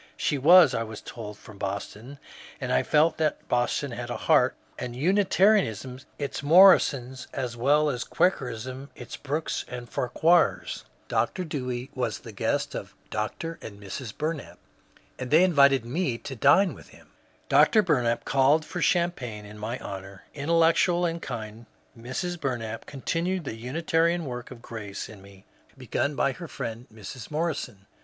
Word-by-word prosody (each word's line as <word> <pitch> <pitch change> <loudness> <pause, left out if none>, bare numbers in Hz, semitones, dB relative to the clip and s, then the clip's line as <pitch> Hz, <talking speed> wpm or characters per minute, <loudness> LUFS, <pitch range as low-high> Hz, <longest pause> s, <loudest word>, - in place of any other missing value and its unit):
She 145 - 0
was, 165 -1 +7
I 115 - 0
was 110 -1 -6
told, 105 -3 -8
from 110 -2 -14
Boston, 105 +6 -5 0.4
and - - -2
I 65 - +4
felt 155 +2 +3
that 155 -1 -1
Boston 125 +3 0
had 120 0 -6
a - - -3
heart, - - +3 0.2
and 120 -1 -5
Unitarianism 180 - +2 0.2
its 140 -2 -4
Morrisons 140 -6 +5
as 125 -3 -3
well 145 +6 +3
as 125 -4 -1
Quakerism 130 - -1
its - - -8
Brookes 150 +3 -3
and 125 -1 -7
Farquhars. 160 +10 +1 0.2
Dr. 185 - 0
Dewey 130 -5 -4
was 120 -6 -2
the - - -11
guest - - -1
of - - -7 0.2
Dr. 135 +10 -4
and 100 -2 -9
Mrs. 105 +4 -6
Bumap, 155 +4 -4 0.6
and 130 - -4
they 160 +6 +6
invited 140 -8 +5
me 130 -1 -1
to 135 - -7
dine 145 - +4
with - - -14
him. - - -19 0.4
Dr. 215 -2 +5
Bumap 120 -9 +1
called 140 +4 +3
for 180 - -5
champagne 135 - 0
in 105 +1 -11
my 115 +4 -3
honour. 95 -2 -8
Intellectual 165 +3 +3
and 170 0 -2
kind 110 0 -7 0.3
Mrs. 155 +9 -4
Bur 130 -3 0
nap 115 -1 -7
continued 170 +6 -2
the 135 - -5
Unitarian 165 +7 0
work 125 -2 -6
of 120 -3 -12
grace 105 -4 -6
in 105 -3 -13
me 100 0 -16 0.3
begun 145 +1 -2
by 140 - +2
her 170 +5 -8
friend 115 -2 -6
Mrs. 110 +2 -9
Morrison. 150 - -3
130 Hz, 155 wpm, -26 LUFS, 115-165 Hz, 0.6 s, was